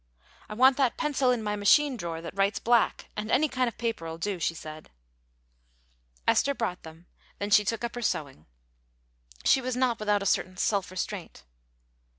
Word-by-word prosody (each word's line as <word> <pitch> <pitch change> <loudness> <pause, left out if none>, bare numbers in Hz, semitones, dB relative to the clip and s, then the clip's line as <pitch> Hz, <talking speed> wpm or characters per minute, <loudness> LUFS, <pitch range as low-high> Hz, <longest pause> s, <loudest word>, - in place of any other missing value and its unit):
"I 210 - -6
want 260 +3 +5
that 265 -4 +1
pencil 290 -5 +1
in 245 -3 +1
my 210 -1 -1
machine 260 +8 +4
drawer, 170 -6 -5
that 170 - -8
writes 200 +1 +1
black, 235 -1 +1
and 210 +1 -4
any 280 +6 +3
kind 255 -2 0
of 235 - -5
paper'll 165 -9 -3
do," 190 +2 -3
she 165 0 -1
said. 155 -1 -10 1.4
Esther 280 0 +3
brought 205 -8 -3
them; 160 +2 -13 0.3
then 205 +1 -4
she 210 - +6
took 225 +3 -2
up 235 - -3
her 245 - -5
sewing. 140 - -3 1.0
She 265 - +5
was 255 -1 -3
not 250 -3 +1
without 210 -1 +1
a - - -6
certain 185 -1 0
self 195 -1 0
restraint. 185 - -6
210 Hz, 175 wpm, -28 LUFS, 185-245 Hz, 1.4 s, she